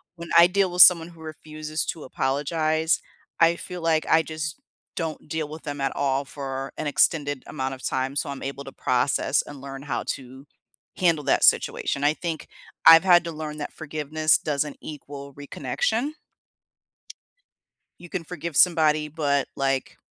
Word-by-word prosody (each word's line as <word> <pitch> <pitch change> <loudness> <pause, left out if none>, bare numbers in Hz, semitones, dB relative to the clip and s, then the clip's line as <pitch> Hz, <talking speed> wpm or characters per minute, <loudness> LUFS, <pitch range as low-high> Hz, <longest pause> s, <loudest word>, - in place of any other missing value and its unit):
when 170 0 -9
I 170 +1 +9
deal 190 0 +1
with 180 +1 +4
someone 170 -2 +8
who 165 -2 -16
refuses 155 -1 -5
to 160 - -5
apologize, 155 +5 0 0.4
I 165 0 +5
feel 180 +1 -8
like 160 -1 +1
I 160 - +5
just 155 -1 -5 0.4
don't 160 -3 -5
deal 155 0 -3
with 155 +1 -9
them 145 -2 -5
at 135 - 0
all 135 0 0
for 135 -1 -6
an 155 - -4
extended 145 -2 +1
amount 130 0 -4
of 130 - -11
time, 130 +1 -2
so 140 - -1
I'm 140 -1 -6
able 140 +1 -5
to 135 - -10
process 130 +2 +1
and 145 - -10
learn 135 0 -8
how 145 - -3
to 130 +1 -6 0.5
handle 165 -5 +2
that - - +2
situation. 140 - +2
I 145 +1 +4
think 165 -1 -5 0.4
I've 165 0 +10
had 175 -2 +6
to 170 - -4
learn 155 -1 -6
that 145 - -6
forgiveness 155 0 0
doesn't 145 -1 -2
equal 140 -2 -9
reconnection. 145 - -2 1.9
You 175 - -12
can 175 -1 -4
forgive 170 -2 -6
somebody, 155 -3 +4
but, 145 -3 0
like, 135 -1 -1
150 Hz, 165 wpm, -24 LUFS, 140-165 Hz, 1.9 s, I've